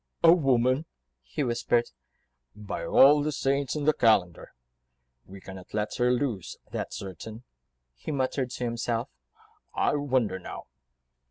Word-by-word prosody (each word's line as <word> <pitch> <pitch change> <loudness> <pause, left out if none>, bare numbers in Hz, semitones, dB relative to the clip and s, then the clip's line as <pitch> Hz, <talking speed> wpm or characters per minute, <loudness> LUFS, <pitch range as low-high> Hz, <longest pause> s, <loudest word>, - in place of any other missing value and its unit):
"A 165 0 +9
woman!" 130 -2 +2 0.4
he 65 +1 -4
whispered, 120 -1 0 0.6
"by 105 -1 -6
all 145 +2 +6
the 150 +1 -1
Saints 140 -1 0
in 150 -2 -2
the 155 - +5
calendar." 100 - +1 0.7
"We 95 +1 -11
cannot 95 +1 -10
let 105 0 -2
her 125 -1 +3
loose, 120 - -2
that's - - -4
certain," 105 +5 -8 0.5
he 60 - -7
muttered 130 -2 -1
to 125 - -5
himself. 115 0 -2 0.7
"I - - +2
wonder 130 -9 0
now - - -8
120 Hz, 135 wpm, -27 LUFS, 105-140 Hz, 0.7 s, A